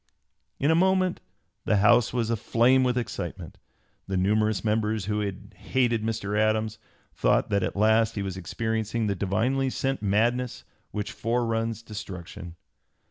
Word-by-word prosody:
In 145 +3 +3
a - - +5
moment 185 +1 +2 0.4
the 110 - +3
House 115 +4 +4
was 115 -2 -1
aflame 120 +3 +3
with 125 -1 +1
excitement. 120 - -5 0.5
The 95 -1 -1
numerous 105 +3 +1
members 110 -1 0
who 105 +1 -1 0.3
hated 120 -4 0
Mr. 110 -2 -2
Adams 110 0 +1 0.3
thought - - +1
that 100 0 +2
at 90 - -2
last 110 +2 +3
he 100 - -2
was 95 -2 -4
experiencing 110 +4 -2
the 100 - +1
divinely 120 +8 0
sent 135 +1 -2
madness 115 +5 0 0.3
which 105 0 -4
foreruns 115 -1 -1
destruction. 95 -4 -8
110 Hz, 135 wpm, -26 LUFS, 105-120 Hz, 0.5 s, a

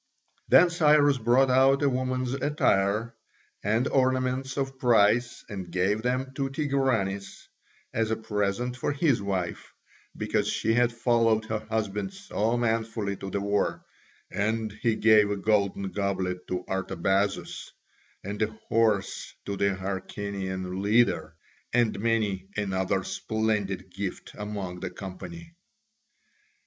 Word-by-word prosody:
Then 175 0 +6
Cyrus 150 -4 +4
brought 125 +3 +4
out 135 +2 +4
a - - +4
woman's 130 -1 -1
attire 115 -6 +1 0.5
and 110 +6 +1
ornaments 130 0 +1
of 135 -1 -2
price 120 0 +3
and 95 -4 -6
gave 95 +4 +1
them 130 +2 -1
to 135 0 -2
Tigranes 130 -9 -1 0.5
as 110 0 0
a 110 - +1
present 105 +3 -2
for 130 - -1
his 140 -6 +2
wife, 95 -3 -3 0.5
because - - 0
she 110 - +1
had 120 +1 +3
followed 115 -2 +2
her 110 -1 -2
husband 110 - -2
so 120 - -1
manfully 110 -3 -1
to 95 - -6
the 100 +1 -2
war, 100 0 0 0.5
and 110 +1 -1
he 110 +2 0
gave 110 -2 +5
a 105 - -1
golden 100 -2 +1
goblet 95 -2 -2
to 90 0 -3
Artabazus, 95 +1 -1 0.5
and 105 +2 -5
a 110 - +3 0.2
horse 110 -3 +1
to 100 - -3
the 100 0 +1
Hyrcanian 95 -1 -4
leader, 100 -7 +2 0.4
and 120 -4 +2
many 105 -4 0
another 95 -1 0
splendid 100 -2 -2
gift 95 0 -5
among 100 -4 -5
the - - -4
company. 165 - -9
110 Hz, 125 wpm, -27 LUFS, 100-125 Hz, 0.5 s, Then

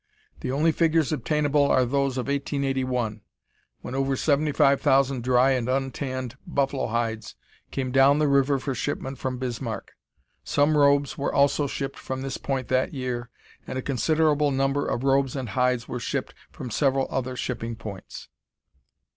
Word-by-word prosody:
The 130 - -3
only 155 +5 +3
figures 160 -2 +2
obtainable 150 +1 +1
are 130 - +4
those 135 +1 0
of 125 - -2
1881, 130 -5 -1 0.6
when 125 - -7
over 135 0 0
seventy 150 +2 +2
five 140 0 +3
thousand 135 -3 +2
dry 125 +1 +4
and 125 -2 0
untanned 130 -1 -2
buffalo 140 -1 0
hides 115 -1 -2 0.3
came 130 -2 -3
down 135 +2 +5
the 150 0 +2
river 140 0 +3
for 135 +1 -3
shipment 130 +1 -3
from 130 -1 -3
Bismarck. 120 -2 -4 0.5
Some 145 +2 +2
robes 140 -1 +3
were 140 - 0
also 140 +1 +3
shipped 135 0 -4
from 130 0 -5
this 135 -1 -3
point 135 -3 -3
that 130 +2 +1
year, 125 -2 -3 0.4
and 130 - -4
a 130 - -3
considerable 150 +3 +2
number 135 +1 0
of 120 - -2
robes 135 -1 +2
and 130 -4 -4
hides 125 +2 +1
were 125 - -4
shipped - - -3 0.2
from 125 - -8
several 135 +2 +2
other 130 -1 -2
shipping 115 -2 -4
points. 105 -4 -9
135 Hz, 160 wpm, -25 LUFS, 125-140 Hz, 0.6 s, down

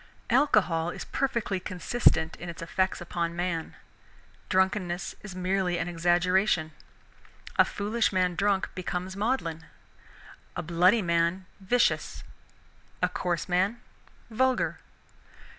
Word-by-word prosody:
Alcohol 185 - +3
is - - -6
perfectly 235 -8 -1
consistent 180 -2 +1
in 175 - -7
its 165 0 -7
effects 185 +2 0
upon 170 -1 -2
man. 175 -2 -2 0.7
Drunkenness 185 -1 0
is 195 -3 -9
merely 185 -1 0
an 170 - -2
exaggeration. 175 0 +2 0.9
A - - +8
foolish 215 +3 0
man 185 -2 +1
drunk 195 +1 +1
becomes 185 0 -4
maudlin; 195 -8 -2 0.9
a - - -3
bloody 180 +6 +3
man, 170 +2 +1
vicious; 240 +6 +1 0.8
a - - +4
coarse 175 -2 -2
man, 190 +6 +1 0.5
vulgar. 260 +3 +1
185 Hz, 110 wpm, -28 LUFS, 170-200 Hz, 0.9 s, A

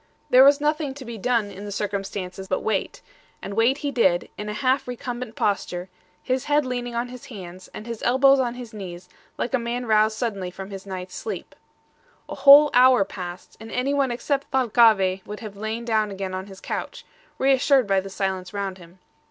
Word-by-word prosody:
There 255 +1 +8
was 280 +1 +6
nothing 295 -2 -1
to 275 -2 -9
be 230 -2 -7
done 225 -2 0
in 195 +1 -9
the 205 - -6
circumstances 195 -2 -4
but 185 - -1
wait; 210 -3 -2 0.4
and 200 - -7
wait 230 +6 +3
he 285 - 0
did, 185 -9 +2
in 210 0 -6
a - - -3
half 255 +5 +1
recumbent 245 -1 -5
posture, 185 -3 -1 0.3
his 255 -1 -1
head 295 -1 +2
leaning 245 -1 -4
on 240 +1 -2
his 250 -1 -10
hands, 185 -5 -10
and 210 - -10
his 230 -2 -6
elbows 270 +2 +5
on 245 -2 -1
his 245 -3 -9
knees, 180 -4 -8 0.3
like 245 - -3
a 260 - +3
man 240 +1 -3
roused 215 -1 +3
suddenly 200 -7 -2
from 190 +2 -9
his 195 0 -8
night's 185 -1 -6
sleep. 435 - -6 0.7
A - - -6
whole 290 +1 +8
hour 250 -4 +6
passed, 180 -2 -8
and 225 0 -10
anyone 275 +2 +1
except 275 +3 -2
Thalcave 220 -7 +3
would 210 +2 -7
have 215 -3 -8
lain 220 +3 -4
down 220 -2 +1
again 195 -1 -5
on 185 +1 -5
his 190 -1 -12
couch, - - -5 0.3
reassured 270 -1 +3
by 195 -1 +2
the 195 +1 -6
silence 190 -1 -3
round 195 -2 -3
him. 175 +1 -16
220 Hz, 195 wpm, -24 LUFS, 195-255 Hz, 0.7 s, There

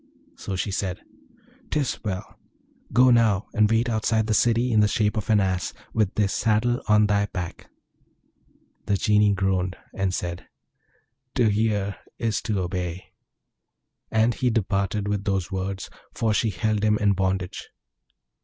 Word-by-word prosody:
So 95 - -5
she 100 +2 -2
said, 95 -1 -2 0.7
''Tis 145 -4 -1
well! 100 -2 -5 0.5
Go 125 +2 +5
now, 110 -4 +3
and 105 -2 +3
wait 115 +2 +2
outside 110 -1 +1
the 110 - 0
city 120 +3 +2
in 110 - +4
the 105 - +5
shape 105 -1 +1
of 110 0 -4
an 110 -2 +5
Ass, 95 -2 -1 0.2
with 105 -4 +1
this 100 -2 +1
saddle 115 +3 +1
on 105 -1 +5
thy 105 0 +1
back.' 90 -4 -6 1.2
The 100 - +2
Genie 105 +1 +3
groaned, 95 -1 0 0.2
and 95 -1 -1
said, 90 -1 -4 0.9
'To 120 -4 +3
hear 105 -2 0 0.2
is 110 -3 -1
to 105 -4 -1
obey!' 90 0 -4 1.0
And 110 +1 +2
he 125 +3 0
departed 100 -2 0
with 105 -1 -1
those 95 -2 -1
words, 95 0 -3 0.3
for 110 -2 +1
she 110 +1 +1
held 105 +3 -1
him 105 0 +3
in 105 -1 +3
bondage. 95 -1 -2
105 Hz, 150 wpm, -24 LUFS, 95-110 Hz, 1.2 s, Go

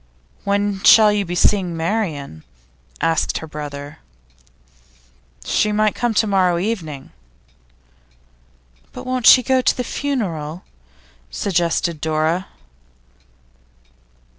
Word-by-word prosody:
'When 200 -1 -1
shall 215 0 +7
you 205 -1 -1
be 175 0 -4
seeing 180 -2 +1
Marian?' 160 - -3 0.6
asked 165 -1 0
her - - -6
brother. 145 0 -8 1.5
'She 210 - +1
might 215 0 +1
come 240 -2 -2
to 220 - +3
morrow 185 -4 +2
evening.' 170 -8 -4 1.8
'But 250 - -9
won't 255 -3 0
she 255 - +8
go 260 +2 +2
to - - +1
the 250 - -1
funeral?' 185 - -4 0.7
suggested 170 - -1
Dora. 160 +3 -1
185 Hz, 100 wpm, -19 LUFS, 160-215 Hz, 1.8 s, she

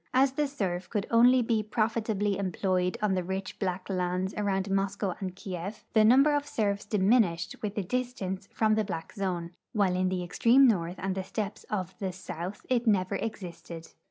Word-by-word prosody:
As 265 +1 +5
the 295 +2 0
serf 190 -10 -3
could 205 -3 -1
only 245 +1 +6
he 225 -2 +2
profit 220 +1 -1
ably 205 -1 +1
employed 185 -1 0
on 210 -2 +2
the 185 -1 0
rich 190 +2 -4
black 185 -2 -2
lands 185 0 -1
around 195 -2 0
Moscoav 195 -1 -1
and 185 -2 -4
Kief, 190 +2 -6
the 220 - +5
number 270 +7 +6
of 290 0 0
serfs 205 -6 -1
diminished 200 -4 +2
Avith 210 -1 -4
the 205 - -1
distance 200 -4 -3
from 220 -1 +2
the 215 0 +2
black 165 -5 -5
zone, 180 -4 -3 0.3
Avhile 190 -3 +3
in 185 - +2
the 185 -1 -2
extreme 240 +9 +5
north 175 -6 +1
and 190 0 -2
the 190 0 -3
steppes 210 +1 -4
of 190 -3 -3
the 190 -2 -2
south 180 +1 -7
it 245 -2 +1
never 195 -2 +2
existed. 170 -6 -7
195 Hz, 185 wpm, -29 LUFS, 185-220 Hz, 0.3 s, only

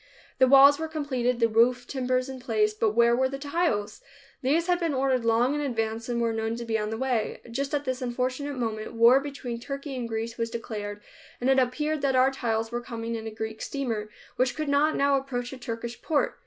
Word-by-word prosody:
The 260 - +6
walls 275 +2 +8
were 320 - -2
completed, 260 -6 -1
the 230 - +4
roof 240 +2 +3
timbers 255 -1 -1
in 265 -1 -7
place, 215 -4 +1
but 215 0 0
where 235 0 +5
were 260 +1 +2
the 275 - -4
tiles? 280 -8 -1 0.4
These 300 +6 +2
had 355 0 +2
been 330 -5 0
ordered 260 -2 +1
long 230 +4 +3
in 295 - -1
advance, 225 -4 -2
and 240 -1 0
were 230 -1 +1
known 225 0 -2
to 235 0 -6
be 225 -1 -1
on 210 0 -2
the 220 - -3
way. 245 -3 -1
Just 275 +4 -2
at 290 0 -2
this 260 0 -2
unfortunate 255 +3 -2
moment 220 -3 -3
war 235 +3 +6
between 275 -4 -6
Turkey 275 +2 -6
and 240 -2 -4
Greece 225 +1 -4
was 230 0 -1
declared 210 -3 -6 0.4
and 255 +2 +2
it 265 - +5
appeared 300 +4 0
that 270 -1 +1
our 255 +1 +5
tiles 225 -4 -2
were 240 0 -2
coming 230 -1 -5
in 225 -1 -4
a - - -2
Greek 220 0 -6
steamer, 230 -7 -3 0.3
which 255 0 +1
could 305 -2 -3
not 290 +2 +3
now 280 0 +3
approach 250 -2 -4
a - - -7
Turkish 235 0 -6
port. 305 -3 0
250 Hz, 220 wpm, -27 LUFS, 230-275 Hz, 0.4 s, walls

